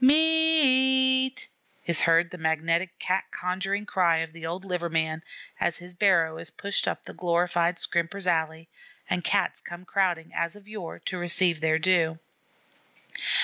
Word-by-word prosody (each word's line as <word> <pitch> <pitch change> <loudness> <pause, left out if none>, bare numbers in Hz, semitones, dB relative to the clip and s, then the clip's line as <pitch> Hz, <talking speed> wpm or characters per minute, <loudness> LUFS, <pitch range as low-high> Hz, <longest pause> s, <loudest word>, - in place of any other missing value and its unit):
M 260 - +7
e 265 -5 +5
a - - -6
t!" 260 - -13 0.4
is 170 -1 +1
heard 165 +1 +3
the 180 - -9
magnetic, 165 +3 -1
cat 185 +1 -1
conjuring 195 +3 -3
cry 175 -5 +2
of 160 0 -4
the 165 -1 -7
old 180 +3 -6
liver 180 -2 -3
man, 160 -1 -2 0.4
as 170 - -1
his 180 0 -12
barrow 170 -4 +2
is 165 -1 -6
pushed 200 0 -2
up - - -3
the - - -10
glorified 175 0 0
Scrimper's 170 +4 -2
Alley, 160 -2 -1 0.4
and 180 -1 -2
Cats 200 -2 0
come 175 +1 -10
crowding, 180 -5 -1
as 170 +3 -2
of 205 -1 -17
yore, 210 -6 -8
to 185 - -3
receive 175 -1 +1
their 160 0 +2
due. 160 -1 +1
175 Hz, 165 wpm, -26 LUFS, 165-195 Hz, 0.4 s, M